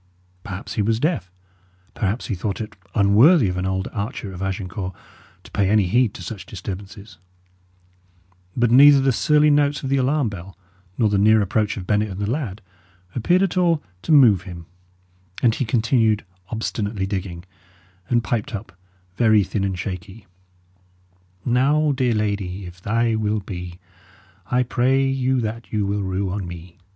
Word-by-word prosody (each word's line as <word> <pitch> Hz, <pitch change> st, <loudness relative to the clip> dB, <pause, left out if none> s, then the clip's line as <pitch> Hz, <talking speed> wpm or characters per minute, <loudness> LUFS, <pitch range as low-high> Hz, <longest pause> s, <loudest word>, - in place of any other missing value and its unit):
Perhaps 100 Hz, +2 st, -6 dB
he 110 Hz, -, 0 dB
was 110 Hz, +2 st, +1 dB
deaf; 150 Hz, -, -1 dB, 0.6 s
perhaps 105 Hz, +3 st, -2 dB
he -, -, -3 dB
thought 100 Hz, +2 st, -3 dB
it 110 Hz, -2 st, -6 dB, 0.2 s
unworthy 110 Hz, -, +5 dB
of 90 Hz, -, -3 dB
an 90 Hz, +1 st, -2 dB
old 95 Hz, 0 st, -2 dB
archer 105 Hz, -2 st, -4 dB
of 90 Hz, -, -8 dB
Agincourt 95 Hz, -1 st, -4 dB, 0.5 s
to -, -, -15 dB
pay 100 Hz, -2 st, +1 dB
any 105 Hz, -1 st, +3 dB
heed 115 Hz, +4 st, +2 dB
to 90 Hz, -, -8 dB
such 100 Hz, +1 st, -7 dB
disturbances; 100 Hz, 0 st, -8 dB, 1.4 s
but 120 Hz, -1 st, +2 dB
neither 140 Hz, +3 st, +8 dB
the 135 Hz, 0 st, +2 dB
surly 150 Hz, +4 st, +3 dB
notes 145 Hz, 0 st, +2 dB
of 135 Hz, -, -3 dB
the 140 Hz, -, +2 dB
alarm 135 Hz, +1 st, +1 dB
bell, 95 Hz, -2 st, -8 dB, 0.4 s
nor 115 Hz, -, +3 dB
the 100 Hz, -1 st, +1 dB
near 110 Hz, +2 st, +5 dB
approach 105 Hz, +1 st, 0 dB
of 95 Hz, -, -6 dB
Bennet 105 Hz, +1 st, +1 dB
and 95 Hz, 0 st, -7 dB
the 100 Hz, -, -2 dB
lad, 110 Hz, -6 st, -3 dB, 0.5 s
appeared 175 Hz, -, +2 dB
at 190 Hz, -2 st, -1 dB
all 170 Hz, -4 st, +2 dB, 0.2 s
to 165 Hz, -, -3 dB
move 120 Hz, -, +6 dB
him; 90 Hz, -3 st, -9 dB, 0.8 s
and 115 Hz, -3 st, +5 dB
he 130 Hz, -, -2 dB
continued 110 Hz, -2 st, +1 dB, 0.2 s
obstinately 105 Hz, -3 st, -3 dB
digging, 95 Hz, -3 st, -4 dB, 0.7 s
and 120 Hz, -1 st, +2 dB
piped 120 Hz, +4 st, -2 dB
up, 100 Hz, -1 st, -8 dB, 0.5 s
very 110 Hz, -3 st, +4 dB
thin 95 Hz, +2 st, -3 dB
and 95 Hz, -2 st, -2 dB
shaky: 95 Hz, +3 st, -7 dB, 1.2 s
"Now, 145 Hz, +5 st, +2 dB
dear 130 Hz, -4 st, +1 dB
lady, 100 Hz, -3 st, -2 dB
if 90 Hz, 0 st, -11 dB
thy 115 Hz, +3 st, +1 dB
will 110 Hz, -1 st, 0 dB
be, 90 Hz, -2 st, -7 dB, 0.7 s
I 125 Hz, +1 st, +2 dB
pray 130 Hz, +2 st, +1 dB
you 130 Hz, -1 st, 0 dB
that 110 Hz, -2 st, -5 dB
you 105 Hz, -2 st, 0 dB
will 100 Hz, +1 st, -1 dB
rue 95 Hz, 0 st, -2 dB
on 95 Hz, -2 st, -4 dB
me." 85 Hz, 0 st, -10 dB
105 Hz, 165 wpm, -22 LUFS, 95-125 Hz, 1.4 s, neither